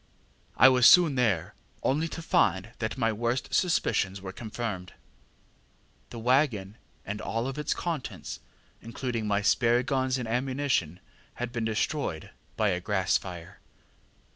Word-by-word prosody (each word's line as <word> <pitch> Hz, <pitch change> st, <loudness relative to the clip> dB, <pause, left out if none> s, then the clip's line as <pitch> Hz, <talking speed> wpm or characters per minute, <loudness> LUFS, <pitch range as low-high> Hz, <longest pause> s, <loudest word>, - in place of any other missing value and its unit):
I -, -, +8 dB
was 125 Hz, -2 st, +6 dB
soon 175 Hz, -5 st, +7 dB
there, 105 Hz, -10 st, 0 dB, 0.3 s
only 150 Hz, +5 st, +1 dB
to 165 Hz, 0 st, -7 dB
find 95 Hz, -, +2 dB
that 110 Hz, +3 st, -3 dB
my 115 Hz, -3 st, +1 dB
worst 120 Hz, +4 st, -2 dB
suspicions 105 Hz, -, +1 dB
were 95 Hz, 0 st, -7 dB
confirmed. 105 Hz, -4 st, -5 dB, 1.2 s
ŌĆ£The 115 Hz, -, -8 dB
waggon 120 Hz, -6 st, +1 dB, 0.3 s
and 105 Hz, +2 st, -5 dB
all 115 Hz, +3 st, -2 dB
its 150 Hz, +3 st, -2 dB
contents, 130 Hz, -, -5 dB, 0.4 s
including 115 Hz, -1 st, -4 dB
my 105 Hz, 0 st, +1 dB
spare 120 Hz, +3 st, +3 dB
guns 130 Hz, -1 st, 0 dB
and 125 Hz, -3 st, -4 dB
ammunition, 125 Hz, -, -1 dB, 0.3 s
had 120 Hz, 0 st, -4 dB
been 120 Hz, -2 st, -2 dB
destroyed 110 Hz, -, -2 dB, 0.3 s
by 110 Hz, -2 st, +2 dB
a 90 Hz, -2 st, -1 dB
grass 95 Hz, -1 st, 0 dB
fire. 85 Hz, -3 st, -10 dB
115 Hz, 135 wpm, -28 LUFS, 100-130 Hz, 1.2 s, I